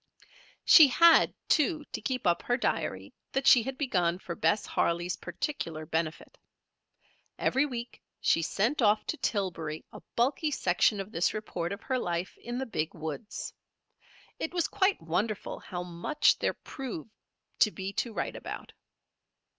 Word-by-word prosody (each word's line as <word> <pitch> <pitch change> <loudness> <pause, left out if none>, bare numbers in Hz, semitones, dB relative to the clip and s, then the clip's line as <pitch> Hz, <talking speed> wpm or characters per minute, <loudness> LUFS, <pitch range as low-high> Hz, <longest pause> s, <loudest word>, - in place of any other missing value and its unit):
She 315 -4 +9
had, 335 +5 +6 0.2
too, 310 0 +2
to - - -4
keep 255 -4 -2
up 175 -1 +3
her 245 - 0
diary - - -2 0.2
that 270 0 0
she 245 - +8
had 260 +3 -5
begun 180 - +1
for 180 -2 -6
Bess 165 +6 +1
Harley's 175 +1 0
particular 165 - -4
benefit. 160 0 -3 1.0
Every 270 +3 +2
week 240 -3 -7 0.2
she 165 - +3
sent 225 - 0
off 210 -1 +3
to 315 - -3
Tillbury 170 - -2
a - - -10
bulky 270 +6 +1
section 200 -4 +2
of 195 +2 -5
this 175 0 +1
report 180 -5 -3
of 200 - -6
her 260 -1 0
life 175 -3 -3
in 240 +1 -5
the 265 - -2
Big 160 -9 -3
woods. 160 +7 -6 0.9
It 330 - -4
was 345 - +2
quite 390 0 +1
wonderful 200 +6 -2
how 180 -2 -6
much 180 - +1
there - - 0
proved 230 - -7 0.5
to 215 - +6
be 195 -1 -6
to 235 - -2
write - - -3
about. - - -7
210 Hz, 155 wpm, -29 LUFS, 170-265 Hz, 1.0 s, She